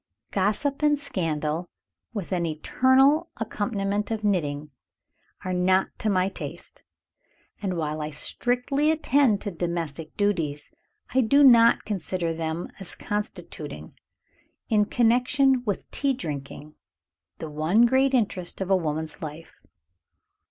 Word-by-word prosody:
Gossip 215 +10 0
and 295 -1 +3
scandal, 165 - -2 0.4
with 205 -6 -5
an 180 -2 0
eternal 260 - +3
accompaniment 205 -2 -2
of 220 -1 -3
knitting, 150 -7 -1 0.7
are 185 - -1
not 185 +1 +2
to 215 - 0
my 185 -2 +2
taste; 195 - -8 0.8
and, 190 -4 -2
while 155 -1 -2
I 150 - -3
strictly 250 - 0
attend 280 -8 +3
to 205 - -3
domestic 165 -3 -4
duties, 165 -8 -1 0.4
I 260 - +4
do 280 +5 +4
not 235 -3 +6
consider 180 -4 -2
them 160 +1 -3
as 195 - -7
constituting, 210 0 -5 0.8
in 210 -3 +3
connection 250 +3 +3
with 205 -3 -2
tea 275 -2 +1
drinking, 150 - -6 0.6
the 160 -2 -7
one 160 +10 +3
great 265 +2 +3
interest 195 -7 -1
of 190 0 -2
a - - +6
woman's 160 -2 -2
life. 155 +1 -8
195 Hz, 125 wpm, -25 LUFS, 165-245 Hz, 0.8 s, not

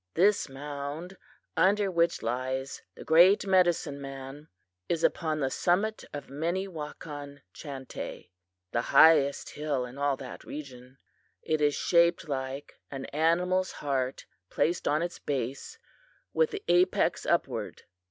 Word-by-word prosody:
"This 200 -1 +3
mound 145 +5 -6 0.4
under 195 +4 +3
which 170 -1 +1
lies 130 +2 -3
the - - -10
great 175 +6 +6
medicine 175 -6 +2
man 135 +2 -8 0.4
is 170 -1 0
upon 155 -3 +1
the 135 -1 0
summit 200 +9 +1
of 145 - -6
Minnewakan 150 -3 -5
Chantay, 135 - -8 0.4
the 120 - +1
highest 150 -2 +5
hill 145 -4 -2
in 125 +3 -10
all 140 -1 +1
that 130 -2 -9
region. 130 -3 -9 0.5
It 155 -1 0
is 145 -1 +3
shaped 170 -1 +3
like 135 0 -5
an 135 -1 -6
animal's 180 +4 +2
heart 135 -3 -2 0.2
placed 170 +2 0
on 150 +3 +2
its 175 - -5
base, 135 - -4 0.6
with 475 -1 +3
the 415 -1 -6
apex 180 +1 +3
upward. - - -1
150 Hz, 125 wpm, -29 LUFS, 135-175 Hz, 0.6 s, great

